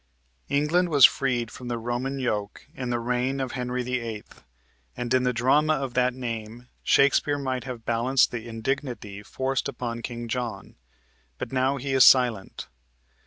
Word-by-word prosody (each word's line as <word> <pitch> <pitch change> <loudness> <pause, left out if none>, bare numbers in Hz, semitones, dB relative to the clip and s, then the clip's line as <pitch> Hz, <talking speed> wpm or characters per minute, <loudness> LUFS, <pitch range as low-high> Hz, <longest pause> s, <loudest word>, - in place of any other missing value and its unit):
England 150 +6 +2
was 145 -5 +8
freed 120 -4 +1
from 125 - -9
the 120 -1 -2
Roman 120 +4 -3
yoke 105 -6 -3
in 130 -6 -5
the 120 - 0
reign 125 +3 -1
of 130 -2 -2
Henry 125 -1 -3
VIII., 115 -4 -3 0.7
and 120 0 -2
in 130 - +4
the 125 0 +1
drama 140 +6 +3
of 135 -3 -4
that 125 0 +1
name 120 -1 -6
Shakespeare 140 +1 +3
might 130 -3 -3
have 120 -3 -7
balanced 120 +3 +2
the 120 -1 -6
indignity 115 -3 -4
forced 130 +5 -2
upon 120 -3 -5
King 120 0 -6
John, 115 -5 -4 0.6
but - - -5
now 135 +1 +1
he 135 +1 -3
is 130 -1 +6
silent. 120 -8 +4
125 Hz, 160 wpm, -26 LUFS, 120-135 Hz, 0.7 s, was